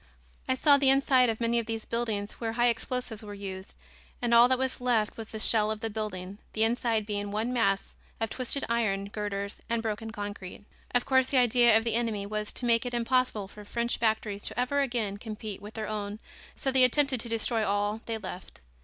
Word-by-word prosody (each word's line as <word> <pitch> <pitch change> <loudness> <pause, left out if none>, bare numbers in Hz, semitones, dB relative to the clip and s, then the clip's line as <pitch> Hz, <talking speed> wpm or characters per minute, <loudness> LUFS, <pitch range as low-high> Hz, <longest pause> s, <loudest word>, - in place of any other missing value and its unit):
I 260 - +3
saw 285 +2 +5
the 275 -1 +4
inside 265 -2 +4
of 225 - -2
many 235 0 +1
of 230 - -4
these 225 -1 -3
buildings 220 -3 -2
where 225 -1 -2
high 240 +1 +3
explosives 235 -1 -3
were 205 -1 -8
used 190 -1 -7 0.4
and 240 -1 0
all 235 +1 +8
that 260 0 +2
was 260 0 -2
left 235 -4 +1
was 225 -1 -7
the 220 - -7
shell 215 -1 +4
of 215 0 -3
the 225 -1 -3
building, 200 -2 -5
the 220 - +2
inside 225 -1 +1
being 205 -1 -3
one 220 +4 -1
mass 200 -5 +1 0.3
of 225 -1 -2
twisted 260 +2 -1
iron 200 -4 0
girders 200 -1 -4
and 230 -1 0
broken 225 0 -3
concrete. 205 -2 -7 0.3
Of 245 - +2
course, 260 -1 +3
the 270 - +1
idea 240 -2 +5
of 225 - 0
the 230 -1 0
enemy 225 -3 -1
was 210 +1 -3
to 250 - 0
make 230 -1 +3
it 245 -1 -3
impossible 240 -4 +1
for 210 +1 -12
French 235 +3 -2
factories 215 -2 0
to - - -3
ever 280 +3 +1
again 235 -7 -1
compete 215 -2 -6
with 210 +2 -10
their 220 -1 -3
own 210 -1 -4 0.4
so 270 - 0
they 260 -1 +5
attempted 265 0 +3
to 235 - -5
destroy 225 0 0
all 205 +2 0
they 225 -1 -2
left. 185 - -9
225 Hz, 215 wpm, -29 LUFS, 210-240 Hz, 0.4 s, all